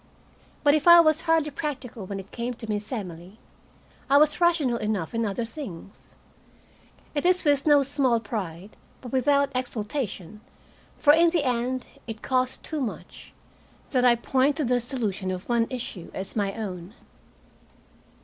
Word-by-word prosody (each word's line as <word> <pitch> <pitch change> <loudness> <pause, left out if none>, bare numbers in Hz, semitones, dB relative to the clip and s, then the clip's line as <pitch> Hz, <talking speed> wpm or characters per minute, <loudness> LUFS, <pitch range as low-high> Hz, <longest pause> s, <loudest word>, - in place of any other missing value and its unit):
But 290 - +5
if 310 +2 +1
I 345 0 +10
was 310 -1 +4
hardly 325 -3 +1
practical 260 - -5
when 195 0 -5
it 195 +1 -11
came 240 +1 -4
to 225 -1 -9
Miss 210 +1 -3
Emily, 185 -4 -6 0.7
I 280 - +6
was 300 +3 +3
rational 320 -9 +3
enough 210 -6 -2
in 230 -1 0
other 215 +4 -2
things. 215 - -10 1.0
It 290 - -1
is 365 +1 +3
with 285 0 +2
no 290 -2 +6
small 265 -4 +1
pride 200 -4 -6 0.2
but 245 - -9
without 280 +2 +2
exultation, 215 - -4 0.6
for 290 - +6
in 335 +2 +5
the 330 -3 0
end 250 0 -1 0.2
it 220 -1 -7
cost 255 0 0
too 310 -2 -3
much 240 - -7 0.6
that 255 -2 +2
I 245 -1 +6
point 265 +4 +1
to 305 - -1
the 245 0 +2
solution 220 -6 -3
of 185 0 -5
one 235 -1 +2
issue 240 -9 -6
as 190 0 -5
my 200 -2 -1
own. 190 -2 -6
245 Hz, 160 wpm, -26 LUFS, 210-285 Hz, 1.0 s, I